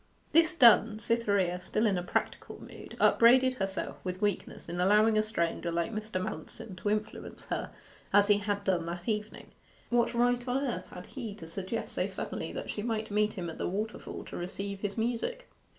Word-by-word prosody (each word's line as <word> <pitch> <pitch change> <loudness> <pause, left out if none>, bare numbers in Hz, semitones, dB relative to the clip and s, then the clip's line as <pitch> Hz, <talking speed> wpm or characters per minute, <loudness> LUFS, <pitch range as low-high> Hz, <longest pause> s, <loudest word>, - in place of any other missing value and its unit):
This 325 0 +4
done, 230 -5 +6
Cytherea, 200 -5 +1
still 215 +4 0
in 205 -3 +3
a 180 - -1
practical 175 - -3
mood, - - -11
upbraided 255 +2 +6
herself 195 0 -3
with 185 0 -4
weakness 205 -2 -2
in 175 - -4
allowing 210 +4 +5
a 215 - +5
stranger 170 -5 -1
like 170 +6 -1
Mr. 215 -3 -3
Manston 185 +4 -5
to 205 - -2
influence 215 +1 -3
her - - -2 0.4
as 205 0 +6
he 205 -1 +5
had 205 0 -2
done 180 -4 0
that 175 +1 -5
evening. 210 -1 -3 0.4
What 240 0 +2
right 245 +1 +2
on 250 +1 +1
earth 245 -10 -2
had 180 - -9
he 230 -7 -6
to 185 -6 -10
suggest 190 +6 -4
so - - 0
suddenly - - -5
that - - -5
she 210 - -4
might 220 -1 -2
meet 210 +1 +2
him 175 -2 -4
at 165 - -7
the - - -1
waterfall 215 +5 -4
to - - -8
receive 195 +3 -4
his 205 0 -3
music? 245 - -2
210 Hz, 190 wpm, -30 LUFS, 185-230 Hz, 0.4 s, done